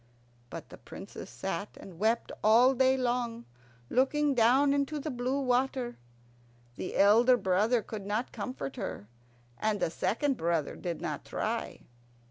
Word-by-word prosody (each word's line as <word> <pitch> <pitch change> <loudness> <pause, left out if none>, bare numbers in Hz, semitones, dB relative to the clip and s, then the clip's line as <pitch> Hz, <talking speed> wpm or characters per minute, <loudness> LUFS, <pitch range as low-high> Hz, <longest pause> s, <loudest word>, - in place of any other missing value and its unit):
But - - -8
the - - -12
Princess - - -10
sat - - -5
and 180 -4 -12
wept 225 +3 +1
all 235 +5 +6
day 260 0 +3
long, 240 -2 -1 0.4
looking 280 - +2
down 260 +4 +4
into 285 +2 0
the 305 +2 -4
blue 255 +2 -1
water. 255 -1 0 0.8
The 185 - -5
elder 230 +5 +6
brother 210 +4 +2
could 205 -3 -7
not 215 +4 -2
comfort 260 +1 -5
her, 190 - -5 0.5
and 215 -1 0
the 160 - 0
second 265 - 0
brother 165 -3 -1
did 170 -2 -5
not - - -4
try. - - -3
240 Hz, 140 wpm, -30 LUFS, 210-265 Hz, 0.8 s, all